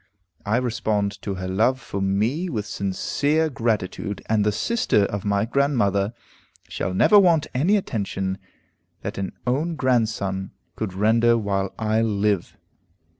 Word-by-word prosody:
I 110 +3 +2
respond 110 -5 -1
to 100 - -3
her 95 0 -5
love 110 +8 +2
for 100 -6 -5
me 110 - 0
with 110 -8 -3
sincere 145 +11 0
gratitude, 105 -4 -2
and 110 -2 +2
the 105 - +2
sister 110 - +1
of 100 0 -4
my 100 0 +1
grandmother 115 -6 +1 0.5
shall 90 - -3
never 205 - +6
want 170 -6 +4
any 170 +11 +3
attention 95 - -3 0.6
that - - -4
an 95 - -3
own 150 +7 0
grandson 110 -8 0 0.2
could 100 -4 -4
render 115 +3 +3
while 100 -3 -2
I 110 0 +1
live. 105 -4 0
110 Hz, 135 wpm, -23 LUFS, 100-125 Hz, 0.6 s, never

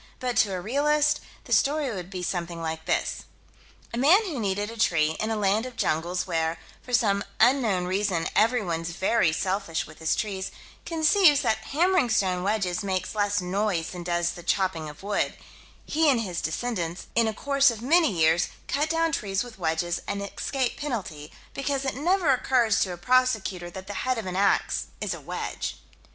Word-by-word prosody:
But 250 -1 -2
to 200 -3 +3
a 185 - -2
realist, 295 +8 +2 0.2
the - - -2
story 290 -2 +2
would 180 -4 -6
be 185 -2 -5
something 170 -1 -3
like 160 0 -4
this: - - -1 0.7
A 235 - -2
man 310 +10 +6
who 315 -9 -4
needed 205 0 -1
a - - -9
tree, 160 -6 +2
in 215 - -1
a 225 - 0
land 210 +3 +1
of 250 - -10
jungles, 170 +1 -1
where, 165 -2 -1 0.2
for 250 - -11
some 205 -5 +2 0.2
unknown 225 -7 +3
reason, 185 -2 0
everyone's 195 -8 +1
very 185 +1 +2
selfish 185 0 -1
with 155 - -14
his 160 -1 +1
trees, 190 -3 -3 0.4
conceives 320 -2 +4
that 220 -4 0
hammering 345 -2 +2
stone 185 -4 +1
wedges 195 -2 0
makes 190 -2 -2
less 205 -1 +1
noise 180 -2 -1
than 180 - -7
does 175 0 0
the 175 - -9
chopping 175 -3 0
of 150 +5 -13
wood: 205 0 -1 0.5
he 315 0 +2
and 250 -4 +3
his 180 -6 -3
descendants, 175 -1 -3
in 230 -1 +3
a - - +1
course 275 +5 +3
of 230 -1 -5
many 325 +4 +4
years, 165 0 +3 0.2
cut 295 +3 0
down 330 0 +1
trees 200 -7 -1
with 240 -4 -12
wedges, 170 +1 -1
and 200 0 -2
escape 255 +5 -2
penalty, 195 - -5 0.2
because 275 0 -2
it 265 - 0
never 340 +2 +2
occurs 245 -4 +2
to 185 - +1
a 175 - -6
prosecutor 220 -5 +1
that 185 +2 -9
the 205 - -6
head 255 -1 0
of 225 - -4
an 185 -1 -4
ax 195 +1 +1
is - - -2
a - - -8
wedge. - - -4
205 Hz, 185 wpm, -26 LUFS, 180-255 Hz, 0.7 s, man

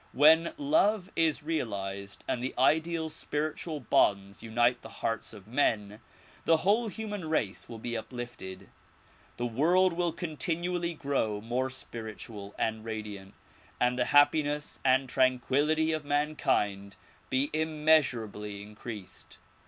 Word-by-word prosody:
When 160 - +5
love 220 - +2
is 160 -3 +2
realized 100 -10 -3
and 125 - -1
the 130 - -3
ideal 160 +5 +2
spiritual 155 0 -3
bonds 100 -5 +2
unite 120 +2 +2
the - - -10
hearts 115 - -3
of 105 -4 -12
men, 105 -4 0 0.4
the 165 - +4
whole 220 +4 +3
human 205 -5 -5
race 105 -11 -1
will 115 - -7
be 120 +2 -4
uplifted, 115 -5 -7 0.7
the 120 - -1
world 170 +10 +3
will 175 0 0
continually 170 +1 -2
grow 135 -8 -1
more 120 +4 -1
spiritual 110 -5 -8
and 110 -1 -1
radiant 105 -3 -6 0.4
and 125 0 +2
the 125 - +3
happiness 145 +1 +3
and 130 0 +3
tranquillity 135 +5 +2
of 155 -1 -2
mankind 125 -10 0 0.3
be 130 +2 +1
immeasurably 135 -10 +1
increased. 105 -2 -9
130 Hz, 120 wpm, -30 LUFS, 110-160 Hz, 0.7 s, When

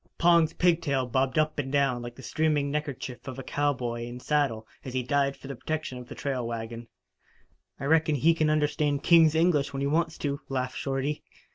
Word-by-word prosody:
Pong's 170 -2 +4
pigtail 165 -7 +2
bobbed 130 +2 0
up 155 -1 +1
and 135 -2 -3
down 135 -4 +2
like 120 0 -7
the 130 - -12
streaming 150 +1 0
neckkerchief 140 -4 -4
of 130 -1 -6
a 135 - -6
cowboy 125 -5 -1
in 120 +1 -7
saddle 130 -6 0 0.2
as 130 -1 -7
he 130 - 0
dived 140 +2 +1
for - - -10
the 140 - -5
protection 155 -2 -4
of 125 - -10
the - - -9
trail 130 -4 -2
wagon. 115 0 -5 0.9
"I - - -4
reckon 160 +1 +3
he 155 +5 +4
can 155 -2 +1
understand 150 -1 +1
king's 165 -3 +6
English 160 -4 +2
when 135 - -3
he - - 0
wants 160 +2 0
to," 140 -1 -3
laughed 130 -1 -2
Shorty. 135 +2 -2
140 Hz, 195 wpm, -27 LUFS, 130-155 Hz, 0.9 s, king's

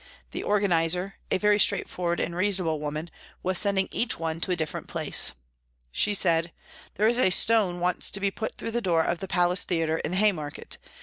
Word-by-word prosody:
The - - -4
organiser, 180 -2 +1
a - - +2
very 210 +1 +3
straightforward 175 -3 0
and 170 - -2
reasonable 180 -4 0
woman, 150 +3 -5 0.3
was 185 0 +2
sending 200 -2 +1
each 235 - -1
one 165 0 -3
to - - -1
a 180 - +2
different 160 -2 -4
place. - - 0 0.6
She 205 - +2
said, 165 -3 +2 0.2
" - - -21
There 210 +3 +2
is 240 +2 +2
a 190 - +4
stone 190 -2 +3
wants 180 +1 0
to 200 - -1
be 200 0 0
put 220 +2 -5
through 230 - -5
the 240 +1 -1
door 170 -5 +2
of 170 +1 -1
the 195 - -5
Palace 180 0 +3
Theatre 160 -2 0
in - - -3
the 180 - -1
Haymarket. 180 -8 -1
180 Hz, 200 wpm, -26 LUFS, 165-200 Hz, 0.6 s, a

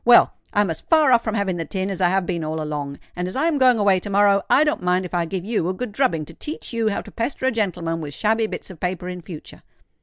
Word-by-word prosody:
Well—I'm 205 -5 +4
as 160 - -5
far 310 -4 +4
off 235 -2 +5
from 220 -1 -2
having 195 -4 0
the 165 - -3
tin 190 +4 -3
as 195 - -4
I 175 - +4
have 190 0 +1
been 170 -2 -2
all 155 +1 -3
along; 145 -2 -4 0.2
and 180 0 -2
as 185 - -6
I 275 +4 +1
am 320 -4 +1
going 255 -2 +5
away 200 -3 +3
to 205 - -7
morrow, 200 0 +4
I 295 - +6
don't 300 -1 0
mind 180 +1 +1
if 180 - -9
I 175 -1 +1
give 185 +2 -4
you 210 -6 0
a 185 - -2
good 250 +3 -4
drubbing 185 - +1
to - - -11
teach 300 -4 -6
you 225 -2 +1
how 200 - -2
to - - -12
pester 250 +3 -3
a 260 - +3
gentleman 175 -7 -2
with 145 -2 -6
shabby 220 +1 +1
bits 210 - -7
of 175 - -13
paper 180 0 -3
in 180 -1 -6
future." 160 -2 -10
190 Hz, 280 wpm, -22 LUFS, 175-225 Hz, 0.2 s, I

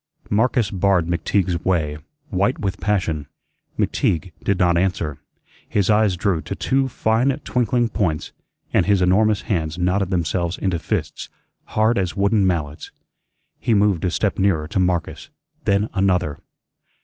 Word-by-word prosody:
Marcus 115 0 +2
barred 95 -2 +2
McTeague's 85 +1 0
way, 80 -5 0 0.3
white 100 - +1
with 100 - -3
passion. 85 -8 -1 0.5
McTeague 90 +2 0
did 100 - +1
not 85 -1 +3
answer. 85 -5 -1 0.5
His 100 0 +2
eyes 105 -3 +3
drew 95 -4 0
to 100 - -5
two 135 +4 +1
fine, 115 +1 +1 0.2
twinkling 120 -1 +1
points, 85 -9 -2 0.4
and - - +3
his 100 -3 +3
enormous 100 +3 +3
hands 80 -4 -2
knotted 90 +2 +1
themselves 85 0 -1
into 95 -4 -1
fists, - - -3 0.4
hard 110 +1 +1
as 90 -2 -2
wooden 100 0 +3
mallets. 75 -5 -2 0.7
He 115 - +1
moved 100 -4 +2
a 90 - +2
step 80 - -1
nearer 90 -6 +1
to 95 - -1
Marcus, 90 - -1 0.4
then 100 +1 +2
another. 90 -7 +1
95 Hz, 140 wpm, -21 LUFS, 85-105 Hz, 0.7 s, not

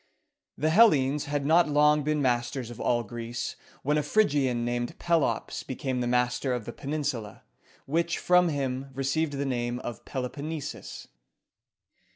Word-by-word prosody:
The 155 +2 +1
Hellenes 150 - +5
had 145 -1 -2
not 165 +2 +4
long 150 +1 +4
been 150 0 0
masters 120 0 -1
of 120 - -10
all 120 -1 +1
Greece, 120 +2 -5 0.3
when 150 +2 +2
a - - +1
Phryg´i 145 -5 +2
an 120 -1 -1
called 120 0 -2
Pe´lops 160 -10 0
became 130 -1 -2
master 125 +1 +1
of 120 -3 -3
the 120 - -6
peninsula, 140 -7 -4 0.4
which 170 +4 0
from 180 -1 +4
him 135 -2 -2
received 140 +3 0
the 140 0 -2
name 120 -2 -1
of 120 -2 -6
Pel 130 -2 -3
o - - -4
pon 145 +2 -7
ne´sus. 155 -3 -6
135 Hz, 160 wpm, -28 LUFS, 125-150 Hz, 0.4 s, Hellenes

